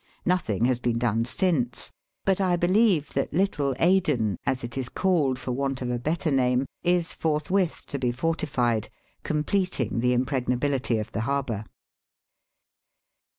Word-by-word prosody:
Nothing 140 - +1
has 125 -1 +2
been 120 -1 0
done 115 -1 +1
since, 130 -4 0 0.3
but 195 0 +2
I 180 -2 +2
beHeve 185 -3 +3
that 135 - -2
Little 150 -8 +1
Aden, 150 - +2
as 130 -1 0
it 120 -1 -5
is 130 -2 -3
called 160 -9 +1
for 125 - -4
want 135 +1 -1
of 125 - -2
a 120 - -1
better 155 +4 -1
name, 125 -1 +2 0.2
is 175 -1 +1
forthwith 160 +3 0
to 140 - -5
be 125 -2 +1
fortified,, 125 -5 0 0.3
completing 150 - 0
the 125 +1 +2
impregnability 125 0 0
of 110 - -4
the 110 - -2
harbour. 120 -4 -2
135 Hz, 145 wpm, -26 LUFS, 120-170 Hz, 0.3 s, beHeve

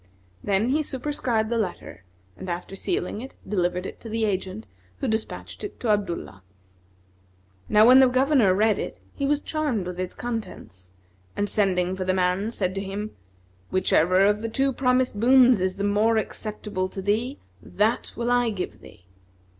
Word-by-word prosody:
Then 205 +4 +1
he 295 +4 +2
superscribed 255 -6 -1
the 235 -1 0
letter 175 - -5 0.3
and 185 - -8
after 175 +2 -5
sealing 195 +2 -2
it, 265 - -9
delivered 180 -2 -1
it - - -7
to 230 - -8
the 225 0 0
agent, 190 - -3 0.3
who - - -3
despatched 220 0 -3
it 415 - -7
to 235 - -2
Abdullah. 175 - -1 1.3
Now 210 +1 +6
when 255 +2 +8
the 265 - +7
Governor 255 -6 +3
read 215 +1 +2
it, - - -5
he 280 - -2
was 290 0 +2
charmed 295 - -2
with 180 0 -6
its 185 -1 -4
contents, 215 - -6 0.4
and 205 - 0
sending 185 -3 +1
for 190 - -3
the 185 0 0
man, 185 +3 +1
said 185 -5 -2
to 195 - -3
him, 200 +2 -5 0.6
"Whichever 185 0 +3
of 205 +1 +3
the 225 - -3
two 270 +4 +1
promised 250 -4 +1
boons 250 -2 +6
is 185 0 0
the 200 - -4
more 210 +3 +2
acceptable 210 -3 -3
to 195 - -6
thee 230 +8 0 0.2
that 220 +3 0
will 235 +1 -1
I 245 -1 +3
give 195 -4 -5
thee." 90 - -16
210 Hz, 170 wpm, -25 LUFS, 185-245 Hz, 1.3 s, when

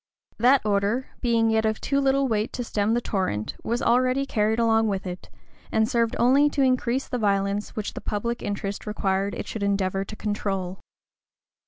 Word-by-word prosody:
That 255 +4 +5
order, 205 +5 0
being 230 -2 +2
an - - +3
yet 220 0 +2
of 220 0 -1
too 280 0 0
little 275 0 +2
weight 215 -2 0
to 245 - -3
stem 215 -1 0
the 240 - +1
torrent, 185 - -2
was 235 +2 -1
always 255 +3 +2
carried 220 -4 +1
along 225 -1 +3
with 195 -2 -2
it, 180 0 -7 0.4
and 220 0 +2
served 235 -2 +1
only 275 +5 +4
to 285 -1 +1
increase 255 0 +1
the 250 - -3
violence 200 -1 0
which 215 -2 -4
the - - -7
public 235 +3 -3
interest 200 0 -4
required 200 -1 -1
it - - -5
should 220 - -5
endeavor 195 -1 0
to 215 - -8
control. 195 -3 -3
220 Hz, 185 wpm, -25 LUFS, 200-245 Hz, 0.4 s, That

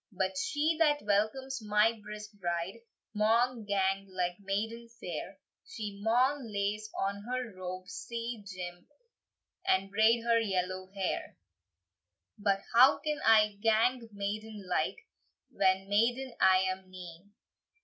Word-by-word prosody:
"But 190 -1 -1
she 300 - 0
that 295 -2 +3
welcomes 220 +6 0
my 210 +2 +3
brisk 210 0 -8
bride 175 +1 -3 0.3
Maun 225 +2 +2
gang 195 -1 0
like 180 -1 -1
maiden 220 +4 -3
fair; - - -6 0.3
She 210 - -7
maun 245 +3 +2
lace 205 +1 -2
on 200 +1 -1
her 245 0 -4
robe 185 0 -6
sae 230 +1 -5
jimp, 180 -2 -8 0.8
And 195 +1 +1
braid 225 +3 +4
her 230 -1 +3
yellow 185 -3 -1
hair." 190 -2 -3 1.0
"But 200 -1 +1
how 255 +4 +7
can 300 -1 -2
I 215 -2 +5
gang 225 +2 +2
maiden 205 +1 -5
like, 180 - 0 0.5
When 190 0 +2
maiden 240 +5 +1
I 185 0 +6
am 185 0 -3
nane? 180 +1 -11
210 Hz, 125 wpm, -31 LUFS, 190-230 Hz, 1.0 s, how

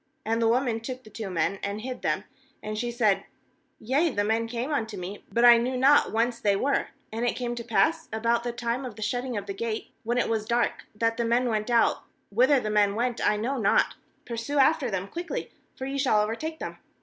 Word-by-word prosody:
4And 225 +1 +1
the 230 - +3
woman 235 -1 +2
took 255 +2 -6
the 215 - -15
two 215 -4 -5
men, 180 +2 0
and 200 +1 -3
hid 255 +2 -5
them; - - 0 0.4
and 215 0 -4
she 240 +3 -2
said: 225 -5 +2 0.6
'Yea, 275 +9 +2
the 205 -7 0
men 225 +2 +1
came 245 +5 -3
unto 220 -6 -2
me, 190 +3 -7
but 235 +4 +3
I 240 -1 +9
knew 255 +2 -1
not 275 +3 +5
whence 235 +1 0
they 205 -3 +2
were; 275 +8 +1 0.2
*and 225 +2 -3
it 245 - +1
came 240 -1 -2
to 240 0 -5
pass 325 +7 +1
about 230 +2 +1
the 240 - -2
time 235 +2 -2
of 245 -5 -6
the 215 - -5
shutting 245 +1 -2
of 200 - -4
the 200 - -4
gate, 220 +2 -4
when 240 +2 -1
it 245 - +2
was 220 -2 -1
dark, 235 +1 0
that 230 +1 0
the 235 - +1
men 240 +2 +2
went 215 0 -1
out; 235 -1 +3 0.3
whither 255 +6 +4
the 215 -3 -3
men 205 -1 +3
went 240 +1 -1
I 210 - +3
know 250 +5 -1
not; 200 -3 +3 0.3
pursue 235 +5 -3
after 275 -1 +4
them 195 -2 -2
quickly; 340 - -5 0.2
for 260 - -5
ye 275 +1 -3
shall 255 -6 +3
overtake 310 +10 -3
them.' - - -6
235 Hz, 230 wpm, -27 LUFS, 215-250 Hz, 0.6 s, I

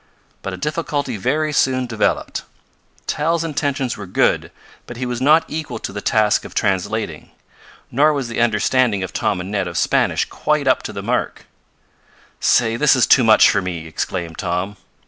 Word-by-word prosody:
But 95 - -5
a - - -5
difficulty 145 - -2
very 150 +9 -1
soon 130 -2 +2
developed. 110 -3 -1 0.6
Tal's 165 +2 0
intentions 140 -5 -2
were 100 - -8
good, 90 - +1 0.4
but 120 - -8
he 130 - -3
was 125 0 -3
not 155 +4 +5
equal 155 0 -5
to - - -6
the 100 - -5
task 105 -1 +2
of - - -11
translating. 100 -4 -1 0.6
Nor 145 +5 +4
was 140 -4 -2
the 115 0 -2
understanding 115 -2 +2
of 95 - -6
Tom - - 0
and 90 +2 -6
Ned 100 -3 -1
of 85 -1 -5
Spanish - - +1
quite - - -1
up - - +3
to - - -6
the - - -6
mark. - - -2 0.9
"Say, 115 -1 +2
this 150 +1 +4
is 130 - +4
too 130 - +5
much 110 -1 +6
for 105 - +1
me!" 85 -3 -5
exclaimed 80 +1 -4
Tom. 90 +3 -2
115 Hz, 175 wpm, -19 LUFS, 100-140 Hz, 0.9 s, much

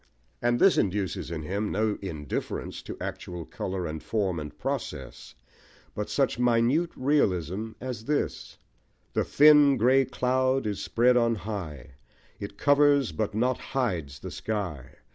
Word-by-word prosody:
and 120 0 +2
this 195 - +5
induces 95 -4 -1
in 80 -2 -4
him 100 +6 -2
no 105 0 +1
indifference 75 -8 -4
to - - -8
actual 85 -2 -6
colour 95 -1 -4
and 80 -1 -5
form 95 -6 -1
and 75 -1 -8
process, - - -5 0.6
but 105 - -4
such 135 -3 0
minute 125 +7 +3
realism 110 - 0
as 125 -3 -6
this 150 0 -2 0.6
The - - +1
thin 145 -2 +6
grey 130 +4 +4
cloud 130 +1 +1
is 105 -2 -2
spread 125 +2 +3
on 115 -1 +3
high, 80 - -7 0.4
It 100 0 -7
covers 145 -1 +4
but 110 -1 -2
not 125 +3 +1
hides 90 - -2
the - - -6
sky. 85 - -4
110 Hz, 140 wpm, -27 LUFS, 90-130 Hz, 0.6 s, thin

